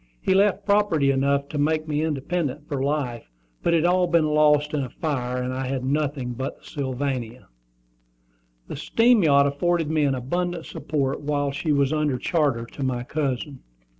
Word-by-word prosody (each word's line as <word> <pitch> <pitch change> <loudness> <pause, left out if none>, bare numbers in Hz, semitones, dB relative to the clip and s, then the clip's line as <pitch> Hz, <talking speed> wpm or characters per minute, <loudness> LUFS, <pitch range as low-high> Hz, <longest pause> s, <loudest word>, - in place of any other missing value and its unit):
He - - +1
left 200 0 +2
property 200 -9 +3
enough 140 +1 +1
to 150 - -3
make 155 +2 +1
me 150 -1 -1
independent 150 -1 -2
for 140 -3 -3
life, 135 - -2 0.3
but 170 - +2
it 160 - +2
had 175 +1 +4
all 180 -1 +2
been 170 -2 +2
lost 150 -1 +3
by 150 - -1
a 130 -2 -3
fire, 125 -4 -3
and 125 0 -3
I 130 0 -3
had 130 -1 -2
nothing 140 -3 -1
but 130 +3 -5
the - - -23
Sylvania. 130 - -4 1.2
The - - -6
steam 230 -1 +3
yacht 140 -4 +5
afforded 160 +3 0
me 155 -2 +2
an 135 -2 +1
abundant 175 +6 -2
support 140 -2 -2
while 145 -1 -1
she 150 +3 -2
was 140 0 +2
under 150 -4 0
charter 140 -7 0
to 130 - -11
my 125 -2 -1
cousin. 140 -1 -3
145 Hz, 180 wpm, -24 LUFS, 135-160 Hz, 1.2 s, yacht